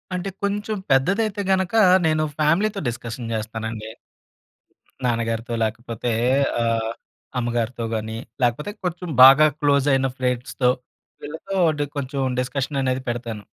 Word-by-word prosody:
అంటే 180 +2 -3
కొంచెం 205 +1 -1
పెద్దదైతే 200 +10 +2
గనక 190 +1 +1 0.3
నేను 155 0 +2 0.2
ఫ్యామిలీతో 195 +8 +2
డిస్కషన్ 115 0 -6
చేస్తానండి. 110 0 -5 1.2
నాన్నగారితో 115 0 -1
లేకపోతే 115 +1 -3 0.5
ఆహ్, 115 -1 0 0.5
అమ్మగారితో 120 0 -2
గాని 110 +1 -4 0.3
లేకపోతే 125 - 0
కొంచెం 180 0 -3
బాగా 140 +4 +9
క్లోజ్ 140 -1 +2
అయిన 135 0 +2
ఫ్రెండ్స్‌తో 125 0 0 0.5
వీళ్ళతో 160 +6 -5 0.2
డి 145 - +1
కొంచెం 140 0 -3 0.2
డిస్కషన్ 135 +2 -2
అనేది 130 0 0
పెడతాను. 115 -3 -4
130 Hz, 110 wpm, -22 LUFS, 115-155 Hz, 1.2 s, బాగా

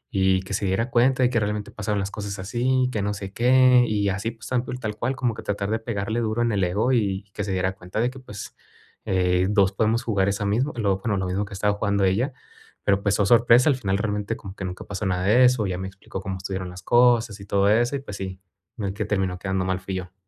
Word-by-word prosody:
y 95 -1 +3
que 95 - -7
se 100 - -1
diera 100 +6 0
cuenta 130 +2 +3
de 125 - +4
que 120 - +2
realmente 105 -1 -3
pasaron 105 -1 -2
las 100 +1 -3
cosas 100 -1 -5
así, 125 +6 +1
que 110 - -2
no 105 +1 -1
sé 100 -1 -7
qué, 125 +1 +5
y 105 -2 +1
así, 105 +4 -2
pues, 115 0 -12
tal 125 -1 +1
cul 125 - -5
tal 110 -3 -4
cual 130 +3 -1
como 125 -3 0
que - - -7
tratar 100 0 -2
de 110 - 0
pegarle 110 0 -2
duro 110 +1 -1
en 120 - +1
el 100 -2 +1
ego 100 +8 +1
y 100 -5 0
que 105 - -3
se 100 - -3
diera 95 0 0
cuenta 90 +2 -6
de 120 +2 +2
que, 135 - -11
pues, 105 -6 -9 0.5
eh, 90 -1 +2
2 100 -2 +3
podemos 110 +4 +1
jugar 100 -4 +1
esa 100 +1 -2
mismo 120 +9 +1
lo 100 -4 +1
bueno, 105 0 -1
lo 95 - -1
mismo 95 +3 -1
que 100 - -11
estaba 105 +2 +1
jugando 100 -1 0
ella. 105 +9 +1 0.5
Pero, 100 -1 +2
pues, 100 0 +1
oh, 100 - +3
sorpresa. 120 +4 +5
Al 140 - +3
final, 100 -6 -1
realmente, 105 -1 -2
como 95 -1 -10
que 100 - -7
nunca 90 0 -6
pasó 100 +1 -4
nada 90 -1 0
de 115 +6 +5
eso. 125 -4 +3
Ella 90 -2 -2
me 95 - -4
explicó 95 0 -8
cómo 95 -1 -4
estuvieron 95 -1 -5
las 90 +1 -10
cosas 120 -3 +3
y - - -9
todo 100 0 +2
eso, 120 +5 +2
y, - - -2
pues, 105 -7 -8
sí, 95 -1 -6 0.4
el 100 -2 -2
que 105 +2 -3
terminó 95 -3 -1
quedando 95 -1 -1
mal 95 0 -1
fui 95 0 -5
yo. 90 -1 -6
105 Hz, 260 wpm, -24 LUFS, 95-115 Hz, 0.5 s, qué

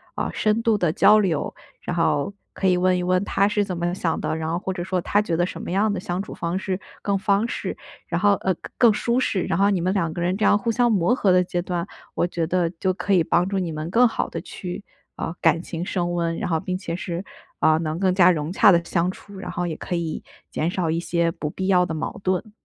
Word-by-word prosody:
呃， - - -2
深 215 +1 +1
度 225 -2 +3
的 175 -5 +1
交 210 +4 +6
流， 180 -8 0 0.3
然 175 - -4
后 165 +1 +1 0.2
可 - - -4
以 180 -1 +4
问 185 0 +3
一 180 - -2
问 180 0 +2
他 195 - +2
是 205 0 +1
怎 185 -3 -4
么 175 +1 -1
想 175 -3 -1
的， - - -1
然 160 0 -3
后 165 - 0
或 190 +1 -3
者 185 -2 -4
说 185 0 -1
他 205 +4 +2
觉 175 -6 -1
得 175 +2 +2
什 - - -6
么 - - -6
样 200 +4 +2
的 200 - -2
相 180 +1 -3
处 - - -9
方 170 +2 -2
式 190 0 -2 0.2
更 200 -1 0
方便。 200 +4 0 0.3
然 170 +1 -1
后， 205 0 +5
呃， 190 - 0
更 - - -12
更 235 -3 +6
舒 235 +4 0
适。 200 -7 0
然 165 - -1
后 200 +1 +4
你 190 -4 +1
们 185 +2 +1
两 170 -5 0
个 170 - -4
人 180 +2 0
这 215 - +1
样 205 - +5
互 220 +3 -1
相 240 +1 +2
磨 205 0 +3
合 215 -6 +1
的 180 0 +5
阶 175 0 -2
段， 175 -1 -3 0.3
我 - - +2
觉 170 -2 -2
得 175 0 +1
就 190 -1 +1
可 200 - -4
以 180 - +5
帮 175 +3 +2
助 195 -1 0
你 175 -3 -3
们 155 +2 -4
更 240 +6 +5
好 - - -2
地 - - -5
去， 180 +1 -7 0.4
呃， 165 - -4
感 165 - +3
情 170 0 -5
升 175 -3 -1
温， 170 -1 -1
然 - - -3
后 165 - +2
并 185 +3 -3
且 170 -3 -4
是， 175 +1 -4 0.3
呃， 155 - +4
能 155 -1 -2
更 190 -1 +2
加 185 -1 +6
融 155 0 -2
洽 205 - +6
地 170 -2 +4
相 170 0 0
处， 200 +1 -13
然 - - -6
后 175 - -2
也 160 - -3
可 180 - -4
以 170 -2 -3 0.3
减 160 - -1
少 175 -2 -1
一 165 - 0
些 170 -1 0
不 150 -2 -4
必 190 +5 -4
要 180 -2 +4
的 165 - -4
矛 155 +5 -4
盾。 185 +3 -1
180 Hz, 290 characters per minute, -23 LUFS, 170-195 Hz, 0.4 s, 交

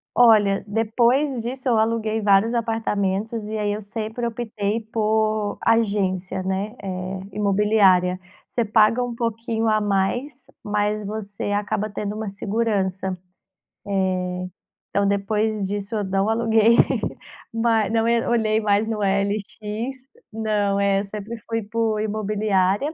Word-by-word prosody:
Olha, 215 -5 +5
depois 235 +5 +2
disso 255 +3 -6
eu 225 - +3
aluguei 220 0 0
vários 205 +2 +4
apartamentos, 220 -2 -1
e 220 - -3
aí 210 -1 0
eu 210 - -3
sempre 220 +3 -4
optei 220 -2 -2
por 215 -1 +1
agência 195 -4 +1
né, 195 +5 -3
eh, 185 0 -4
imobiliária. 195 -3 +3 0.3
Você 235 - -1
paga 220 +2 +3
um 245 -1 -3
pouquinho 230 -1 -2
a 215 0 +3
mais, 210 +7 -1 0.2
mas 210 0 -1
você 205 -1 -5
acaba 205 +1 -1
tendo 205 0 -4
uma 215 0 -4
segurança, 195 -2 -1
eh, 185 - -3 1.8
então 200 0 +1
depois 205 +1 0
disso 205 +2 -4
eu 210 - -1
não 195 +2 0
aluguei 225 0 +4 0.8
ma 225 -3 +2
não, 225 +1 +1
eh, 235 0 +2
olhei 220 -2 +2
mais 210 +1 +2
no 220 -2 -2
OLX, 200 +1 -1 0.7
não, 210 -2 0
é, 200 0 +2
sempre 210 +3 -7
fui 225 0 0
por 220 0 -1
imobiliária. 210 +1 +1
Eh, - - -16
215 Hz, 130 wpm, -23 LUFS, 200-225 Hz, 1.8 s, Olha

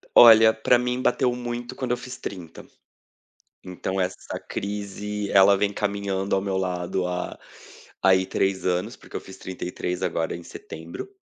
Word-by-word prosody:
Olha, 110 -1 +9
para 120 +2 +3
mim 125 +1 -1
bateu 125 -1 +2
muito 120 +1 -5
quando 130 -2 -3
eu 125 - +1
fiz 125 0 -8
30. 90 -4 -8 1.0
Então 95 +1 -4
essa 90 0 -3
crise 105 0 -4
ela 100 0 +7
vem 100 +1 +1
caminhando 100 -2 -1
ao 95 - +1
meu 95 -1 -1
lado 90 -1 -1
há, 90 0 -4 0.6
aí 95 -1 +5
3 95 0 0
anos, 90 0 0
porque - - -14
eu - - -2
fiz 95 0 -12
33 90 -1 -4
agora 80 -2 -1
em 85 - -9
setembro. 80 - -8
95 Hz, 155 wpm, -25 LUFS, 90-110 Hz, 1.0 s, Olha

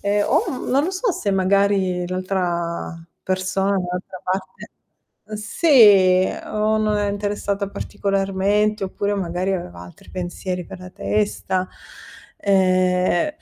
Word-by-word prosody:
ehm, 205 +1 +1
o, - - +2
mhmm, - - -5
non 275 +3 +3
lo 365 - -1
so 385 +4 0
se 205 - -2
magari 190 -1 +2
l'altra 180 -2 -2 0.3
persona, 185 +1 -1
dall'altra 180 -1 -3
parte 185 +1 -4 0.5
mhmm, 215 0 -8
sì 205 - +5 0.2
o 215 +1 0
non 215 -1 +1
è 205 -1 0
interessata 205 -1 -2
particolarmente 200 +2 0
oppure 200 +2 -2
magari 185 0 -2
aveva 90 - -5
altri 85 0 -14
pensieri 180 0 -4
per 180 - -10
la 185 0 -10
testa. 200 -2 -1 0.7
Ehm, 185 - +2
195 Hz, 125 wpm, -21 LUFS, 185-205 Hz, 0.7 s, sì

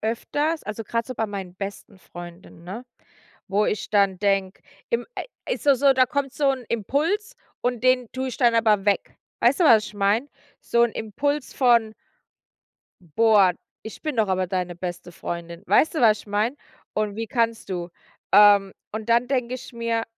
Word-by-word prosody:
öfters. 290 +8 -1
Also, 215 +2 -5
grad 230 +2 -2
so 255 - -6
bei 225 - -1
meinen 195 -3 -7
besten 200 +1 -8
Freundinnen, 175 -1 -12
ne? 205 +8 -7 0.6
Wo 205 +2 +2
ich 210 - -2
dann 200 -3 +2
denke, 195 -1 0 0.3
im 470 - 0
ai - - -3 0.3
ist - - -5
doch 280 - +7
so, 275 +2 +5
da 255 -1 +4
kommt 275 0 -2
so 285 -2 +2
'n 260 -2 -3
Impuls 305 - -1 0.3
und 245 -2 -1
den 255 -2 +3
tue 260 0 -3
ich 255 - -6
dann 240 -3 +4
aber 215 -3 +3
weg. 200 -1 0 0.2
Weißt 255 +8 +3
du, - - +5
was 220 -7 +6
ich 210 - -11
meine? 205 +7 +1 0.3
So'n 235 0 +2
Impuls 280 +7 -2
von 235 -4 +3 1.1
boah, 195 +2 +4 0.3
ich 220 - -10
bin 305 -4 -3
doch 220 -2 +3
aber 185 -1 0
deine 180 -1 -3
beste 175 0 -6
Freundin. 170 +1 -6
Weißt 320 - +3
du, 310 - 0
was 215 -3 +5
ich - - -14
meine? 210 +6 0 0.4
Und 210 -1 -1
wie 225 +1 -4
kannst 230 -2 -1
du? 175 -2 -4 0.4
Ähm, 205 -2 +6 0.2
und 220 +1 -6
dann 235 +1 +3
denke 250 -2 -1
ich 255 - -10
mir: 230 -1 -1
220 Hz, 180 wpm, -24 LUFS, 195-250 Hz, 1.1 s, doch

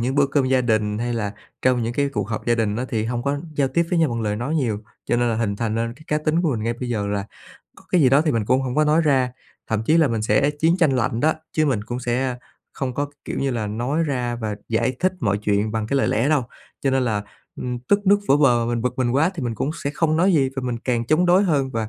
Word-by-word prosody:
những 125 +3 -1
bữa 140 0 +4
cơm 140 0 +1
gia 130 0 +3
đình, 110 -3 0
hay 120 +1 -2
là 105 -3 -2 0.3
trong 125 -1 +3
những 115 +1 -2
cái 140 +3 0
cuộc 105 -6 -3
họp 105 - -4
gia 120 - +3
đình 110 -3 0
á 125 - -2
thì 110 -3 -1
hông 120 +1 -2
có 140 +2 -1 0.2
giao 140 -2 +1
tiếp 170 +6 +2
với 175 - +2
nhau 160 -3 +3
bằng 115 -1 -2
lời 105 -1 -1
nói 125 +8 -2
nhiều. 120 -9 0 0.3
Cho 120 - 0
nên 120 0 +2
là - - 0
hình 105 -3 -1
thành 110 -1 -2
nên 115 +1 -2
cái 145 - -17
cá 150 - +1
tính 155 +3 0
của 165 - +2
mình 110 - -3
ngay 115 - 0
bây 125 +1 -6
giờ 105 -4 -1
là 100 -1 -2 0.5
có - - -17
cái 180 - +5
gì 130 - +6
đó 140 +3 +5
thì 155 -1 +1
mình 115 -3 0
cũng 130 +5 +2
hổng 125 -1 -3
có 155 - +4
nói 155 +2 +3
ra. 130 -4 +2 0.3
Thậm 110 -1 -1
chí 160 - +4
là 160 -3 +4
mình 115 -2 -1
sẽ 140 +6 +2
chiến 160 +4 +1
tranh 165 -6 +3
lạnh 115 -1 0
đó, 155 +3 +3 0.2
chứ 155 -1 +2
mình 110 -7 0
cũng 120 +1 -4
sẽ 125 +1 -1 0.4
không 130 -2 -3
có, 145 +2 -1 0.2
kiểu - - -4
như 135 - 0
là, 115 -4 -2
nói 125 +10 -1
ra 125 -5 -2
và 110 -3 -4
giải 120 +3 0
thích 185 +1 +2
mọi 100 -5 +1
chuyện 105 +1 0
bằng 110 -1 -2
cái 140 - 0
lời 135 - +2
lẽ 115 +6 +1
đâu. 150 -3 +3 0.4
Cho 135 - +1
nên 130 -1 +2
là, 105 -4 -1 0.3
ưm, 125 -1 -4
tức 200 +11 0
nước 200 +1 +6
vỡ 140 - +6
bờ, 120 -5 +3
mình 120 -1 -1
bực 125 0 -2
mình 125 -2 +1
quá 145 +8 +3
thì 160 - -5
mình 120 -2 -2
cũng 135 +6 -2
sẽ 140 - 0
không 155 0 +1
nói 185 +4 +3
gì 140 -5 +3
và 135 - -2
mình 120 -2 -2
càng 120 -1 -1
chống 160 +6 +3
đối 180 +3 +5
hơn 145 -8 +1
và 115 -3 -2
125 Hz, 295 wpm, -22 LUFS, 115-145 Hz, 0.5 s, gì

